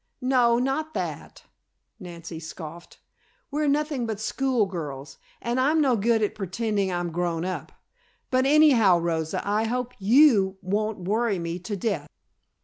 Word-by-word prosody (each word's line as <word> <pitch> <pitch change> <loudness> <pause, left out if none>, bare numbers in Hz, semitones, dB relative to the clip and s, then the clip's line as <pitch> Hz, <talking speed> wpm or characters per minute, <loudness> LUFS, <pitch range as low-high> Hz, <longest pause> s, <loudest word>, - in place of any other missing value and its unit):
"No, 250 -2 +3
not 275 +5 -1
that," - - -5 0.6
Nancy 170 -2 -8
scoffed. 160 +1 -9 0.5
"We're 300 +1 0
nothing 290 -4 0
but 220 -3 -4
school 250 +1 0
girls, 145 -7 -7 0.2
and 240 +2 -2
I'm 295 +5 +3
no 270 -5 +3
good 225 +1 +2
at 210 - 0
pretending 200 0 -2
I'm 175 -1 -2
grown 170 0 -2
up. 185 - -4 0.6
But 260 +1 +3
anyhow, 270 - +5
Rosa, 165 +1 -2
I 210 +2 +1
hope 250 +2 -2
you 205 -3 +5
won't 205 +2 -1
worry 220 0 +1
me 170 0 -4
to 200 +3 -5
death!" 180 -8 -2
210 Hz, 140 wpm, -25 LUFS, 175-250 Hz, 0.6 s, anyhow